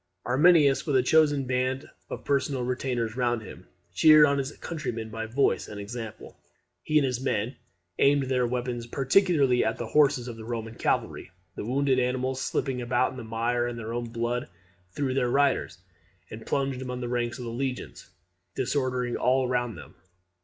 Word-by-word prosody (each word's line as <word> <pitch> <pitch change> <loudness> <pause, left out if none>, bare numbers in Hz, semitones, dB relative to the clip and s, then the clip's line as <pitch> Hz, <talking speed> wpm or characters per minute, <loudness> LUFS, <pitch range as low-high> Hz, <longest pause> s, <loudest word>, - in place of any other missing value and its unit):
Arminius, 145 +2 +4
with 145 - +1
a 130 - +4
chosen 145 -1 +3
band 130 +2 -1 0.2
of - - -7
personal 140 -2 0
retainers 125 -3 -2
round 120 -3 0
him, - - -12 0.3
cheered 155 - +7
on 140 -1 +1
his 135 +1 -3
countrymen 125 -9 -5
by 115 0 -4
voice 130 +5 +1
and 105 - -8
example. 110 +2 -7 0.5
He 155 - +1
and 145 - +4
his 125 -1 -2
men 125 -1 -1 0.4
aimed 140 0 +4
their 130 -2 +1
weapons 120 -1 -3
particularly 135 -1 +3
at 110 - -1
the 120 - -4
horses 140 -4 +3
of 120 -2 -7
the 110 - -9
Roman 115 -1 -5
cavalry. - - -1 0.2
The - - -6
wounded 135 +1 +2
animals, 130 +1 -1
slipping 130 -1 -2
about 125 +1 +1
in 130 - -10
the 125 - -6
mire 120 +2 -1
and 120 -1 -5
their 115 0 -5
own 120 0 -2
blood, 120 +1 -2 0.4
threw 135 +6 -2
their 125 -2 +1
riders, 140 -5 +1 0.5
and 110 +1 -9
plunged 135 -2 -1
among 125 -1 -5
the 120 - -3
ranks 120 -1 -2
of 125 - -7
the 115 - -4
legions, 130 +1 -5 0.5
disordering 125 -2 -1
all 130 +1 +2
round 120 -5 -1
them. 80 - -12
125 Hz, 175 wpm, -27 LUFS, 120-135 Hz, 0.5 s, cheered